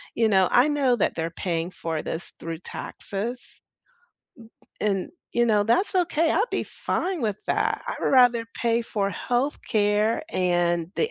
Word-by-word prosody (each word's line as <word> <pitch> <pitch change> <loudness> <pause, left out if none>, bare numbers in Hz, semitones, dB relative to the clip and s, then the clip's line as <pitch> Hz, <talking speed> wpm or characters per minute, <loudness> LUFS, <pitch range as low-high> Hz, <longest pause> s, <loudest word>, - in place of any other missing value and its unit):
you 225 -1 +3
know, 190 -3 +4
I 245 +4 +5
know 280 -4 +2
that - - +1
they're 165 0 -2
paying 170 0 -2
for 160 -3 -3
this 165 - -5
through 165 -1 -5
taxes, 225 +7 -5 1.4
b - - 0
and, 195 -3 0 0.2
you 240 0 +3
know, 210 -2 +3
that's 235 - +2
okay, 335 -3 +2
I'd 425 +8 +1
be - - -1
fine 365 -2 -2
with 210 -3 0
that, - - 0
I'd - - -3
rather 245 -3 +5
pay 235 0 +1
for 200 -3 -1
healthcare 215 -2 0
and 175 -2 +1
the 455 - +1
215 Hz, 155 wpm, -25 LUFS, 180-250 Hz, 1.4 s, I